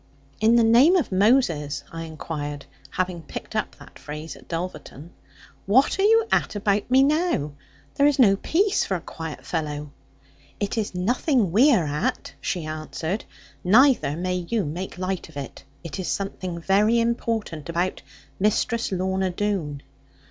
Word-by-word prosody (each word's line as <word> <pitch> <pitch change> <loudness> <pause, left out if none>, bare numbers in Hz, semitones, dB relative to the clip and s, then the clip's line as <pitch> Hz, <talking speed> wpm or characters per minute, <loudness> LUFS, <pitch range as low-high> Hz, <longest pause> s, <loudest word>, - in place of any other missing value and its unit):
'In 225 +2 +4
the 235 - +5
name 245 +11 +6
of 340 - +1
Moses,' 185 - +2
I 165 0 -6
inquired, 145 -2 -6 0.2
having 180 -2 -2
picked - - -8
up - - -2
that - - -15
phrase 150 +1 -7
at - - -17
Dulverton; 165 -2 -6 0.6
'what 260 - +3
are - - +3
you 450 +2 +5
at - - +1
about 205 +1 0
me 260 +1 +5
now? 300 - +1 0.4
There 280 - +4
is 290 - +2
no 210 -7 +6
peace 385 - +1
for 190 - -1
a - - -2
quiet 160 -2 -8
fellow.' 150 -3 -3 0.7
'It 205 +2 -2
is 215 -4 -2
nothing 235 - +1
we 250 - +6
are 185 - +3
at,' 150 +1 -2
she 175 -4 -2
answered; 155 +5 -4 0.4
'neither 225 - +4
may 180 +1 -1
you 225 -4 0
make 175 +5 -5
light 185 -1 -3
of 155 - -12
it. 140 - -7 0.2
It 165 +1 -6
is 185 - -3
something 185 -3 -3
very 210 +6 +3
important 225 -8 -2
about 175 +2 -1 0.4
Mistress 215 +3 +1
Lorna 190 0 0
Doone.' 175 -7 -2
190 Hz, 155 wpm, -24 LUFS, 160-230 Hz, 0.7 s, name